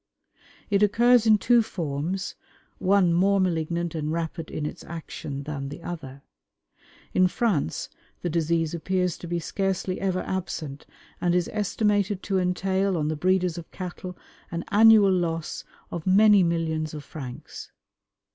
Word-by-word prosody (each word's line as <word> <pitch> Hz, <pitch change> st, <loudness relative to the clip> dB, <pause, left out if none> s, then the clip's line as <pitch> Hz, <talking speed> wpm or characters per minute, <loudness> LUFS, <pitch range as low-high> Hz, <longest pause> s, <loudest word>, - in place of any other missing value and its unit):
It 200 Hz, 0 st, +3 dB
occurs 230 Hz, +3 st, +4 dB
in 215 Hz, -1 st, +7 dB
two 235 Hz, +3 st, +4 dB
forms, 175 Hz, -1 st, -3 dB, 0.5 s
one 185 Hz, -2 st, +3 dB
more 195 Hz, +3 st, +3 dB
malignant 170 Hz, -2 st, -1 dB
and 155 Hz, -2 st, -2 dB
rapid 165 Hz, 0 st, -3 dB
in 150 Hz, -, -4 dB
its -, -, -6 dB
action 150 Hz, -4 st, -6 dB
than 140 Hz, -2 st, -5 dB
the 155 Hz, +4 st, -9 dB
other. 140 Hz, -6 st, -7 dB, 0.9 s
In 185 Hz, 0 st, +5 dB
France 180 Hz, -, -1 dB, 0.4 s
the -, -, 0 dB
disease 165 Hz, 0 st, 0 dB
appears 180 Hz, +1 st, 0 dB
to 175 Hz, -, -8 dB
be 175 Hz, +1 st, -1 dB
scarcely 190 Hz, +1 st, -2 dB
ever 185 Hz, -1 st, 0 dB
absent, 160 Hz, -6 st, -4 dB, 0.3 s
and 175 Hz, 0 st, +2 dB
is 180 Hz, -1 st, 0 dB
estimated 205 Hz, -1 st, 0 dB
to 195 Hz, -2 st, 0 dB
entail 190 Hz, +1 st, 0 dB
on 150 Hz, -1 st, 0 dB
the 155 Hz, -, -1 dB
breeders 180 Hz, +1 st, +1 dB
of 165 Hz, -, -11 dB
cattle 180 Hz, 0 st, -7 dB, 0.3 s
an 170 Hz, 0 st, -4 dB
annual 215 Hz, -1 st, +7 dB
loss 165 Hz, -3 st, -2 dB, 0.3 s
of 170 Hz, +1 st, -5 dB
many 205 Hz, +1 st, +6 dB
millions 160 Hz, -2 st, -1 dB
of 150 Hz, -, -7 dB
francs. 135 Hz, -4 st, -9 dB
175 Hz, 145 wpm, -26 LUFS, 160-195 Hz, 0.9 s, in